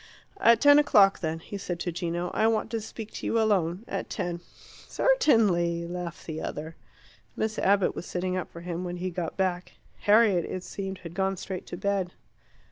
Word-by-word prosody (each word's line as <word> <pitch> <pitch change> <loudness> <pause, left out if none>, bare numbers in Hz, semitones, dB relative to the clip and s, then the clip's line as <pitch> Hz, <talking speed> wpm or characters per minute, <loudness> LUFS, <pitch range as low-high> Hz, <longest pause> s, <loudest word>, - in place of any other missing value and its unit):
"At 230 0 +6
ten 290 +2 +7
o'clock, 205 -9 +5
then," 160 -1 -2
he 200 +4 -7
said 175 -3 -4
to 175 - -2
Gino. 175 0 -3
"I 220 - +3
want 225 0 0
to 225 -1 -2
speak 220 0 -8
to - - -7
you 230 - +2
alone. 195 -2 +1
At - - -4
ten." 175 -1 -3 0.5
"Certainly!" 200 - +3
laughed 175 0 -6
the 160 -1 -5
other. 160 +2 -5 0.6
Miss 220 0 -2
Abbott 200 -1 +3
was - - -7
sitting 185 +1 -2
up 185 - -3
for 170 - -10
him 175 0 -4
when 180 0 -4
he 185 +1 -3
got 170 -2 -4
back. 180 -2 -1 0.3
Harriet, 205 -4 +4
it 185 - -5
seemed, 195 -1 -5
had 170 -1 -8
gone 195 +1 0
straight 185 +1 -6
to 175 - -6
bed. 195 -2 -1
185 Hz, 190 wpm, -27 LUFS, 175-210 Hz, 0.6 s, ten